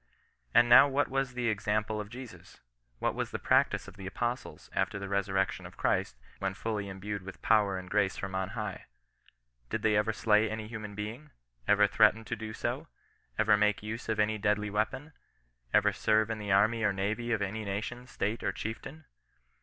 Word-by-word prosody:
And 120 - +7
now 120 +4 +9
what 140 0 +1
was 135 -1 -1
the 125 -1 -1
example 105 0 0
of 105 - -9
Jesus? 125 0 -11 0.4
What - - 0
was - - -3
the - - -3
practice - - +2
of 100 - -12
the 95 -1 -7
Apostles, 120 +5 -4
after - - 0
the 100 0 -5
resurrection 95 -1 0
of - - -16
Christ, - - 0 0.2
when 95 -1 -2
fully 105 -2 -3
endued 100 +1 -5
with 95 +1 -10
power 105 -4 +3
and 95 0 -7
grace 100 0 +1
from 95 -1 -5
on 95 0 -1
high? - - -4 0.8
Did - - -2
they 110 -1 +3
ever 105 +2 +2
slay 105 +1 +3
any 110 -1 -4
human 105 -2 -7
being 110 +7 -5
1 150 - -23 0.4
Ever 105 0 +6
threaten 105 +2 +4
to 115 - -3
do 110 -1 -6
so? - - -3 0.5
Ever 110 -1 +5
make 105 0 +2
use 110 +2 -5
of 110 -1 0
any 105 0 +2
deadly 105 0 +1
weapon? 110 +9 -2 0.6
Ever - - +4
serve 110 0 +2
in 110 - -3
the 105 -2 -3
army 110 +4 +4
or 105 -2 +3
navy 110 +5 -2
of 110 -3 +1
any 105 +3 -3
nation, 110 +5 -4
state, 110 0 -2
or - - 0
chieftain? 135 +8 -6
105 Hz, 195 wpm, -30 LUFS, 100-115 Hz, 0.8 s, now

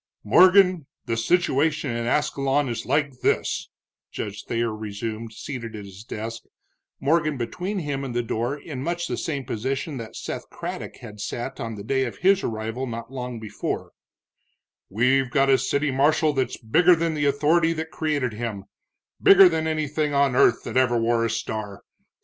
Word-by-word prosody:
"Morgan, 180 - +5 0.2
the 115 - -1
situation 150 +2 +1
in 115 0 -2
Ascalon 140 0 +1
is 115 -1 -4
like 145 -1 0
this," - - 0 0.4
Judge 105 -1 -6
Thayer 115 -1 -1
resumed, 110 +1 -5
seated 115 -1 -7
at 105 -1 -7
his 100 +1 -11
desk, 115 0 -6 0.6
Morgan 155 0 +1
between 180 - -3
him 145 -5 -3
and 125 -3 -5
the 120 - +1
door 120 +5 -2
in 140 -3 -7
much 175 +3 -2
the - - -2
same 140 -5 -3
position 135 +6 -3
that 115 -2 -8
Seth - - -6
Craddock - - -6
had 105 0 -10
sat 120 +5 -5
on 115 -1 -4
the 100 - -8
day 135 +4 0
of 120 - -6
his 195 +1 +4
arrival 115 +3 -3
not 115 +1 -6
long 125 -2 -5
before; 110 -1 -4 1.0
"we've 125 +5 +2
got 135 +1 +3
a 130 - +5
city 140 0 0
marshal 150 +3 +3
that's 130 -3 -1
bigger 175 +11 +4
than 165 0 -1
the 145 -2 0
authority 155 +4 +3
that 160 0 -5
created 145 -8 -1
him, 110 -3 -4 0.6
bigger 195 -1 +9
than 160 -2 0
anything 155 -1 -1
on 140 -2 +3
earth 115 - +4
that - - -3
ever 125 -2 +3
wore 115 0 +2
a 115 - +1
star. 110 -3 -4
130 Hz, 170 wpm, -24 LUFS, 115-150 Hz, 1.0 s, bigger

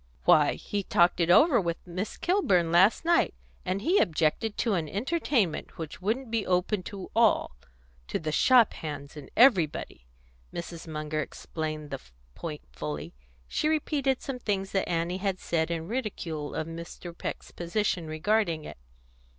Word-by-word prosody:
"Why, 150 -2 +6
he 205 - -3
talked 175 -2 +3
it 170 0 +2
over 255 - +6
with 170 -2 -3
Miss 185 +4 -4
Kilburn 190 - +2
last 190 - +5
night, 340 0 +3 0.3
and 190 +2 -2
he 365 +8 +4
objected 170 +7 +1
to 230 - +1
an 165 -5 -1
entertainment 240 - 0
which 160 +1 -7
wouldn't 225 +5 -1
be 225 -2 +1
open 185 +2 +1
to 195 -2 -8
all 225 - +3 0.5
to - - -1
the 155 -1 -3
shop 245 - +5
hands 145 -2 -7
and 150 -3 -10
everybody." 170 - +3 0.4
Mrs. 170 -1 -7
Munger 155 -1 -3
explained 155 -2 -5
the - - -4 0.3
point 155 -3 -6
fully. 75 -1 -5 0.3
She 300 - 0
repeated 285 -4 0
some 265 -2 -4
things 195 -4 -2
that 195 - 0
Annie 170 +1 0
had 195 -1 -1
said 160 -1 0
in 165 -1 -3
ridicule 180 - -4
of 160 - -2
Mr. 170 +1 -8
Peck's - - -6
position 175 -1 -1
regarding 165 0 0
it. 75 - -9
180 Hz, 155 wpm, -28 LUFS, 160-220 Hz, 0.5 s, Why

